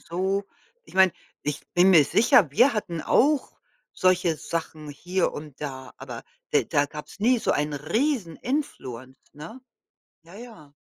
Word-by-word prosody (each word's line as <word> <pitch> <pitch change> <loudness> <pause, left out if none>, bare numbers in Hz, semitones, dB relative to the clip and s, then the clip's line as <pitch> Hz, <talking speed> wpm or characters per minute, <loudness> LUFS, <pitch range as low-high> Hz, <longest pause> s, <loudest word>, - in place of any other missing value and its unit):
so 190 +3 -2 0.4
ich - - -18
meine, 190 -2 +5 0.3
ich 150 0 -4
bin 180 +2 +5
mir 160 -6 +7
sicher, 195 - +4
wir 250 - +4
hatten 185 -7 -3
auch 285 - +2 0.4
solche 185 -2 +2
Sachen 160 -2 -5
hier 175 +6 -1
und 150 -2 -10
da, 135 -3 -7
aber - - -8 0.3
de - - +3
da 145 0 +1
gab's 150 +6 -10
nie 245 +3 +3
so - - 0
einen 150 0 -1
riesen 195 - -1
influence, 130 - -5 0.2
ne? 165 - -10 0.6
Ja, 170 +3 -15
ja. 205 -11 -13
170 Hz, 150 wpm, -25 LUFS, 150-210 Hz, 0.6 s, mir